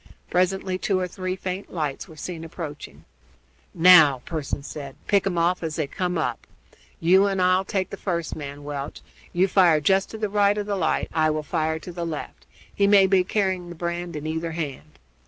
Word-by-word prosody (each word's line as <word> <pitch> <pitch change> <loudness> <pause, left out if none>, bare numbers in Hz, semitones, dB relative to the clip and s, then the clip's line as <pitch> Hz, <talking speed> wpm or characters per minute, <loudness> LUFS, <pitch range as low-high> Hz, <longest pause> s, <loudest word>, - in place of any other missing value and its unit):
Presently 185 0 +1
two 190 -1 0
or 185 - -1
three 185 0 -4
faint 185 +1 -5
lights 150 -5 -3
were 160 - -13
seen 165 +2 -6
approaching. 150 - -8 0.7
"Now," 160 -7 +7
Pearson 150 -3 -4
said, 140 -2 -8
"pick 200 -2 +2
'em 180 -3 -1
off 175 +2 +2
as 160 -2 -3
they 155 - 0
come 180 +4 -2
up. 120 -6 -2 0.5
You 190 +4 +5
and 195 -1 -1
I'll 185 +1 +3
take 190 -1 -2
the - - -6
first 170 -4 -3
man, 145 -1 -7
Welch. 145 -1 -6 0.3
You 185 +2 +2
fire 180 -5 +5
just 190 +6 +2
to 220 - -7
the 215 -1 -1
right 205 0 +2
of 205 - -2
the 205 -1 -1
light, 175 -5 0
I 155 -1 +3
will 155 0 -1
fire 160 +2 -1
to 170 +3 -9
the 170 0 -5
left; 155 - -6 0.3
he 200 - +2
may 200 -1 +6
be 190 -1 +3
carrying 185 -2 -1
the 175 - -8
brand 170 0 -4
in 150 0 -5
either 160 +1 -3
hand." 155 -2 -6
175 Hz, 200 wpm, -24 LUFS, 155-190 Hz, 0.7 s, Now